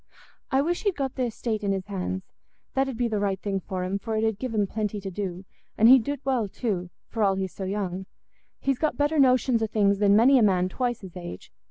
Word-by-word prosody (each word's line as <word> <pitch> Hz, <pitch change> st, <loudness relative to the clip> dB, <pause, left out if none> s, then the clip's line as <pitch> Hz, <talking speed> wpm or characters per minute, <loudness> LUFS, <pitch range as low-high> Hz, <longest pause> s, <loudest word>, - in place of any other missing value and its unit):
I 270 Hz, +1 st, +2 dB
wish 345 Hz, +3 st, -1 dB
he'd 405 Hz, -4 st, 0 dB
got 270 Hz, -2 st, -2 dB
th' -, -, -10 dB
estate 220 Hz, -1 st, -3 dB
in 200 Hz, -, +1 dB
his 190 Hz, -1 st, -3 dB
hands; 190 Hz, -1 st, -3 dB, 0.5 s
that 270 Hz, 0 st, +1 dB
'ud 250 Hz, -, -5 dB
be 240 Hz, 0 st, +1 dB
the 215 Hz, -2 st, -1 dB
right 195 Hz, -2 st, 0 dB
thing 195 Hz, -1 st, -2 dB
for 185 Hz, 0 st, -4 dB
him, 190 Hz, +2 st, -2 dB
for 220 Hz, +2 st, -3 dB
it 215 Hz, -, 0 dB
'ud 220 Hz, -2 st, 0 dB
give 255 Hz, -2 st, -3 dB
him 205 Hz, -1 st, +3 dB
plenty 210 Hz, +1 st, -3 dB
to 195 Hz, -1 st, -6 dB
do, 185 Hz, -1 st, -5 dB, 0.3 s
and 220 Hz, -, +6 dB
he'd 255 Hz, -1 st, +8 dB
do't 285 Hz, +2 st, -4 dB
well 255 Hz, -6 st, +1 dB
too, 190 Hz, -4 st, -3 dB, 0.2 s
for 225 Hz, -, -4 dB
all 195 Hz, -1 st, +3 dB
he's 190 Hz, -1 st, -3 dB
so 195 Hz, -, -5 dB
young; 190 Hz, -1 st, -3 dB, 0.5 s
he's 275 Hz, -2 st, 0 dB
got 310 Hz, -, 0 dB
better 295 Hz, +1 st, +2 dB
notions 255 Hz, -3 st, +4 dB
o' 220 Hz, -, +1 dB
things 200 Hz, -2 st, +2 dB
than 200 Hz, -1 st, +5 dB
many 255 Hz, +5 st, +6 dB
a -, -, +3 dB
man 185 Hz, -3 st, +3 dB
twice 240 Hz, +1 st, -2 dB
his 190 Hz, -3 st, -11 dB
age. 175 Hz, -, -8 dB
210 Hz, 245 wpm, -26 LUFS, 195-250 Hz, 0.5 s, he'd